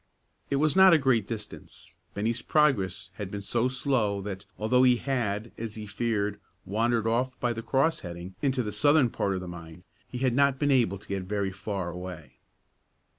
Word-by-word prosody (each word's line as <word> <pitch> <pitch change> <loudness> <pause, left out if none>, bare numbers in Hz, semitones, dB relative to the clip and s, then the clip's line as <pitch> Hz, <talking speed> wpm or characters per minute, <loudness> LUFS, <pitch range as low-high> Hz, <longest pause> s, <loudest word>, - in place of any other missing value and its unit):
It 140 - +1
was 155 +3 +2
not 190 -1 +8
a - - +7
great 130 -7 +2
distance; 105 -3 -8 0.2
Bennie's 115 +4 -1
progress 105 - +1
had 100 -3 -5
been 100 0 -6
so 120 +4 +1
slow 125 -6 0
that, 100 0 -6
although 125 +4 +3
he 125 -1 +6
had, 115 -5 -2
as 115 -2 -5
he 110 -1 -6
feared, 105 -1 -1 0.3
wandered 115 +3 +1
off 125 +3 0
by 120 -1 0
the 115 - -5
cross 135 +7 +1
heading 85 +1 -8
into 130 -3 +1
the 105 - -4
southern 140 +3 +4
part 100 -1 -1
of 90 - -3
the 90 - -7
mine, 85 0 -10 0.2
he 125 - -7
had 130 -1 +1
not 140 +1 +3
been 145 +1 +1
able 115 -8 +3
to - - -16
get 100 -1 -2
very 100 0 -1
far 95 -2 -4
away. 85 -7 -9
110 Hz, 190 wpm, -28 LUFS, 100-130 Hz, 0.3 s, not